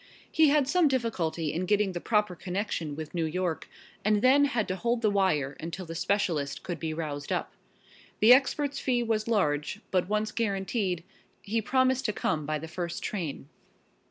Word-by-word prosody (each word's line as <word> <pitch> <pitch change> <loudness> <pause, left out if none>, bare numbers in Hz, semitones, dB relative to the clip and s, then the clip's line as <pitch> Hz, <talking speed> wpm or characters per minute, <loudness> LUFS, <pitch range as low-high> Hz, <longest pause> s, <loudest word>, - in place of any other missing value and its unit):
He 315 -2 +5
had 290 -2 +3
some 355 +1 +4
difficulty 175 - -1
in 180 +3 -2
getting 205 -1 +2
the 175 -1 -5
proper 210 -4 +1
connection 180 -4 -3
with 155 0 -7
New 170 -2 0
York, 170 -1 -2 0.3
and 210 0 +2
then 275 +3 +6
had 240 -7 0
to 185 - 0
hold 235 +4 -1
the 215 - +4
wire 155 -9 +1
until 170 +3 -5
the 165 - -7
specialist 165 -6 -1
could 175 -3 -4
be 160 0 -3
roused 150 -3 -4
up. - - -2 0.7
The 225 +3 +8
expert's 280 +2 +2
fee 245 -2 +1
was 220 -1 -1
large, 155 -5 0
but 185 0 +1
once 215 +1 0
guaranteed, 195 -4 -1 0.4
he 225 +3 -1
promised 260 +2 +2
to 210 - 0
come 155 -6 -1
by 155 0 0
the 160 +2 -7
first 170 +1 -4
train. 165 -9 -4
195 Hz, 180 wpm, -28 LUFS, 165-230 Hz, 0.7 s, The